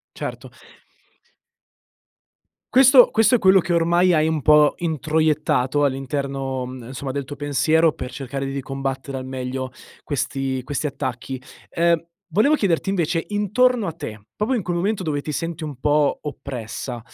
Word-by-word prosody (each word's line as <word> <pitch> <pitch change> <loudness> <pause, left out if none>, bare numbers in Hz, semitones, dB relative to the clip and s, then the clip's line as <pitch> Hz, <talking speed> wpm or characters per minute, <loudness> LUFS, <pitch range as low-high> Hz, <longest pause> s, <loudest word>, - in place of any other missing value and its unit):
Certo. - - -6 2.2
Questo 260 -1 +8
questo 225 +3 +4
è - - -2
quello 190 -2 +5
che 175 0 -3
ormai 170 +2 +3
hai 155 -1 +3
un 160 -2 -1
po' 150 0 +5
introiettato 155 -3 +1
all'interno, 135 -1 -2
mhmm, 125 -2 -9
insomma 130 +1 -5
del 140 0 -3
tuo 145 - -8
pensiero 150 +3 +2
per 125 0 -7
cercare 135 +1 -5
di 135 0 -3
combattere 135 0 -4
al 130 - -5
meglio 130 0 -4 0.3
questi 135 -2 -2
questi 145 +2 -2
attacchi. 130 -2 -5 0.3
Ehm, 170 -1 +1 0.2
volevo 215 - +3
chiederti 195 - 0
invece, 170 -3 0
intorno 210 +3 +2
a 165 - -3
te, 110 -7 -8
proprio 220 +5 0
in 235 - 0
quel 175 0 -2
momento 195 +3 -1
dove 150 -4 -2
ti 150 - -4
senti 165 +2 -4
un 145 -5 -7
po' 150 0 +2
oppressa, 125 -4 -6
150 Hz, 150 wpm, -22 LUFS, 135-170 Hz, 2.2 s, Questo